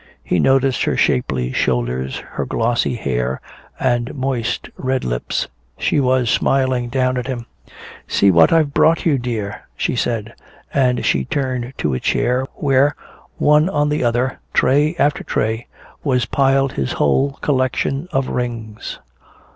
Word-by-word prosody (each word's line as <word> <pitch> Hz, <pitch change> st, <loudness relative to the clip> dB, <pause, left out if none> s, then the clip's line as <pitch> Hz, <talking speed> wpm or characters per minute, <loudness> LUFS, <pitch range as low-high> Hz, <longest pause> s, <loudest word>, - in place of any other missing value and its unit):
He 90 Hz, -, 0 dB
noticed 135 Hz, +2 st, +3 dB
her -, -, 0 dB
shapely 65 Hz, -2 st, +1 dB
shoulders, 65 Hz, +1 st, -1 dB
her -, -, -3 dB
glossy 120 Hz, +1 st, 0 dB
hair 65 Hz, -, -2 dB, 0.4 s
and 120 Hz, +1 st, 0 dB
moist 130 Hz, -3 st, -2 dB
red 130 Hz, 0 st, -1 dB
lips. -, -, -2 dB, 0.3 s
She -, -, +1 dB
was 130 Hz, -2 st, +2 dB
smiling 130 Hz, 0 st, +1 dB
down 130 Hz, 0 st, +1 dB
at 125 Hz, 0 st, -3 dB
him. 120 Hz, -3 st, -4 dB, 0.6 s
"See 100 Hz, -, +4 dB
what 85 Hz, -2 st, +5 dB
I've 155 Hz, -4 st, +3 dB
brought 165 Hz, +1 st, +3 dB
you, 145 Hz, -5 st, +3 dB
dear," 110 Hz, -4 st, -4 dB, 0.2 s
she -, -, -1 dB
said. 115 Hz, -2 st, -2 dB, 0.4 s
And 125 Hz, -3 st, +2 dB
she 70 Hz, -, +2 dB
turned 130 Hz, -, -2 dB
to 75 Hz, -, -1 dB
a 65 Hz, -, -1 dB
chair 125 Hz, +2 st, 0 dB
where, 140 Hz, 0 st, +2 dB, 0.4 s
one 150 Hz, +3 st, +4 dB
on 150 Hz, -4 st, +1 dB
the 150 Hz, -2 st, 0 dB
other, 120 Hz, +2 st, 0 dB, 0.2 s
tray 150 Hz, +5 st, +3 dB
after 145 Hz, -2 st, +1 dB
tray, 110 Hz, +2 st, -1 dB, 0.4 s
was 125 Hz, -4 st, +1 dB
piled 135 Hz, +1 st, +2 dB
his 65 Hz, -2 st, -2 dB
whole 135 Hz, -, +2 dB
collection 135 Hz, +2 st, 0 dB
of 135 Hz, -4 st, 0 dB
rings. 115 Hz, -3 st, -4 dB
125 Hz, 145 wpm, -19 LUFS, 110-135 Hz, 0.6 s, what